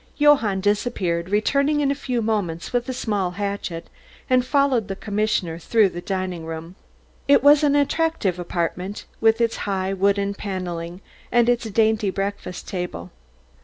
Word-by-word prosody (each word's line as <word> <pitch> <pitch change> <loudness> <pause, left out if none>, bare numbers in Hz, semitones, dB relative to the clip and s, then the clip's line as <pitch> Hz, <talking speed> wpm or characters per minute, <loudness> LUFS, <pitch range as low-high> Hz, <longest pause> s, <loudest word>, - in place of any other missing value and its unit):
Johann 270 -10 +4
disappeared, 190 -4 0
returning 280 +8 +2
in 280 -1 +2
a - - +2
few 255 -4 -2
moments 200 -6 -2
with 245 +1 0
a - - 0
small 210 -7 -1
hatchet, 200 -4 -4 0.4
and 255 -1 +3
followed 260 -5 +2
the 195 - -4
commissioner 200 -5 -1
through 215 +3 +3
the 175 -1 -7
dining 185 -3 -3
room. 165 +1 -7 0.5
It 280 -1 +5
was 290 +1 +6
an 290 -1 +3
attractive 285 - +1
apartment 180 +3 -3
with 225 +1 +3
its 230 -1 +1
high 190 0 -1
wooden 200 +1 +1
panelling 180 -3 -5 0.3
and 240 -1 +4
its 240 -2 +1
dainty 220 -1 +2
breakfast 195 -2 -4
table. 175 - -5
205 Hz, 150 wpm, -23 LUFS, 185-240 Hz, 0.5 s, was